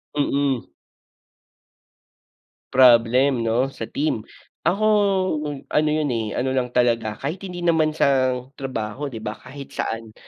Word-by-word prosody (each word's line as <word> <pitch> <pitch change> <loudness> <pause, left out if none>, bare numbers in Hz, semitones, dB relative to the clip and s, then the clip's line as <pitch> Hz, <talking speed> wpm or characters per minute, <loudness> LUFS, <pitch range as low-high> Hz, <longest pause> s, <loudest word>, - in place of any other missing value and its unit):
Mm. 140 -3 0 2.0
Problem 125 +1 +5
'no, 115 +3 +1
sa 115 - -6
team. 145 -6 -1 0.4
Ako 200 +4 +1 0.9
ano 150 0 +3
'yon, 150 -1 0
eh, 110 -2 -3
ano 130 +1 0
lang 130 -2 0
talaga 115 -3 +1
kahit 155 +7 -4
hindi 180 -3 -6
naman 160 -2 +3
sa 130 -3 +3 0.2
trabaho 130 0 -4
'di 120 - -7
ba 110 -1 -4
kahit 135 +4 -11
saan, 115 -1 -4
130 Hz, 125 wpm, -22 LUFS, 115-145 Hz, 2.0 s, Problem